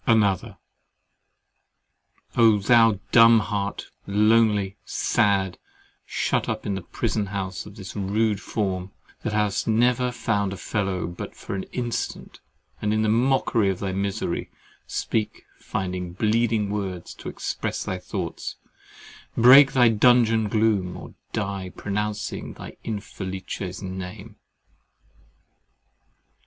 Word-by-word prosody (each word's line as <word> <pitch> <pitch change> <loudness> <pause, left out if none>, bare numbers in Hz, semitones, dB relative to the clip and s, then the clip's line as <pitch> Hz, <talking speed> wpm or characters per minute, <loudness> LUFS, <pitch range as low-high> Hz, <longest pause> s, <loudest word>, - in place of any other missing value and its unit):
ANOTHER 105 -5 +2 1.8
Oh! 115 -3 +6
thou 115 0 +4
dumb 115 -1 +8
heart, 100 -1 -3 0.2
lonely, 105 -1 +3
sad, 100 -4 +1 0.5
shut - - 0
up - - -3
in 100 - -1
the 95 - -3
prison 105 +4 -2
house 95 -2 -4
of 105 - -12
this 95 -3 -9
rude 105 +1 0
form, 95 -4 -2 0.3
that 110 - -2
hast 105 -2 0
never 125 +2 +2
found 100 -5 -1
a - - -6
fellow 95 -1 -2
but 85 +1 -7
for - - -7
an 95 -1 -3
instant, 120 -2 -4 0.4
and 105 +1 +1
in 110 - +1
very 110 0 +3
mockery 120 -4 +2
of 95 - -1
thy 95 0 -3
misery, 100 -1 -2 0.4
speak, 110 -2 -2 0.2
find 90 -2 -4
bleeding 110 -1 +1
words 95 -4 -4
to - - -8
express - - -3
thy 95 - -3
thoughts, - - -5 0.8
break 135 +4 +8
thy 125 -2 +6
dungeon 115 -1 +4
gloom, 105 -4 +1
or - - -10 0.2
die 100 -3 -3
pronouncing 105 +1 -3
thy - - -10
Infelice's 95 -3 -5
name! 95 +3 -7
105 Hz, 120 wpm, -24 LUFS, 95-115 Hz, 1.8 s, dumb